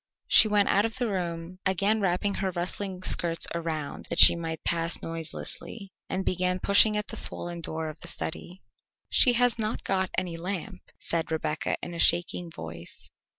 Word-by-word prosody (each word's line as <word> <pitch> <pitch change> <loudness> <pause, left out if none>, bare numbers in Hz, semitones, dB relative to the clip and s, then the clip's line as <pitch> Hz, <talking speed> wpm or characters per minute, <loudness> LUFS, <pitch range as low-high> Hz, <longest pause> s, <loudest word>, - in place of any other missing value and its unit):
She - - +7
went 205 -1 +3
out 200 - +3
of 225 +2 -3
the 245 -2 -1
room, 175 -2 -4
again 200 +3 +2
wrapping 195 +2 0
her 195 -1 -2
rustling 185 +1 -4
skirts 170 -2 +1
around 160 -3 -4
that - - -3
she - - +10
might 165 -1 -5
pass 165 0 -1
noiselessly, 165 +5 -7 0.2
and 190 0 -2
began 180 0 0
pushing 210 +3 +5
at 210 - -2
the - - -6
swollen 175 -1 -2
door 160 0 -3
of 155 +1 -8
the 170 - -8
study. 175 +2 -6 0.5
"She 250 - +7
has 245 -1 +2
not 215 +1 -2
got 190 -1 0
any 180 -3 -2
lamp," 180 +1 -5 0.2
said 165 -1 -2
Rebecca 155 0 -2
in 175 - -5
a 170 - -7
shaking 175 +1 +2
voice. 80 - -8
180 Hz, 175 wpm, -27 LUFS, 165-200 Hz, 0.5 s, she